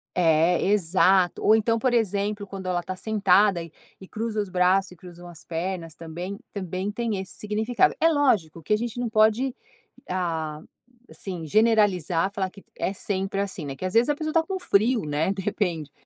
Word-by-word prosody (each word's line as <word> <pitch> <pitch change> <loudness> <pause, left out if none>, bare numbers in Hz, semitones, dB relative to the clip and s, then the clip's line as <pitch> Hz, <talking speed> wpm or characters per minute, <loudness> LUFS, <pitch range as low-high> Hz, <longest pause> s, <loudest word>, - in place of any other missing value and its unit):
É 165 -3 +4 0.2
é - - -2
exato, 185 -1 +3
ou 215 - +6
então 225 +1 +1
por 250 +1 0
exemplo 205 -2 0
quando 190 -1 -7
ela 180 -1 0
tá 185 +2 -6
sentada 200 -2 +3
e 165 - -12 0.3
e 190 - -11
cruza 220 0 -3
os 205 - -5
braços 185 +1 +2
e - - -12
cruzam 175 0 -12
as 170 -2 -12
pernas 170 -1 -4
também, 175 +5 -7
também 190 0 -4
tem 225 -1 -2
esse 190 0 -7
significado. 220 - +1
É 325 - +5
lógico 220 - +1
que 210 - 0
a - - +4
gente 235 +1 -4
não 245 -1 -1
pode 220 +4 +2 0.5
a 160 -4 -2 0.5
assim 180 -4 -6
generalizar, 195 -3 +2
falar 190 -2 -2
que 195 +1 -16
é - - -1
sempre 195 0 -2
assim, 195 -5 -3
né, 135 -1 -5
que 185 - -6
às 185 - -3
vezes 235 +4 +4
a 295 - +2
pessoa 310 +1 -3
está 330 +1 +3
com 380 +3 -4
frio, 230 - +2
né, 150 +5 0
de 195 -1 -4
repente. 180 -7 -2
195 Hz, 195 wpm, -25 LUFS, 175-220 Hz, 0.5 s, ou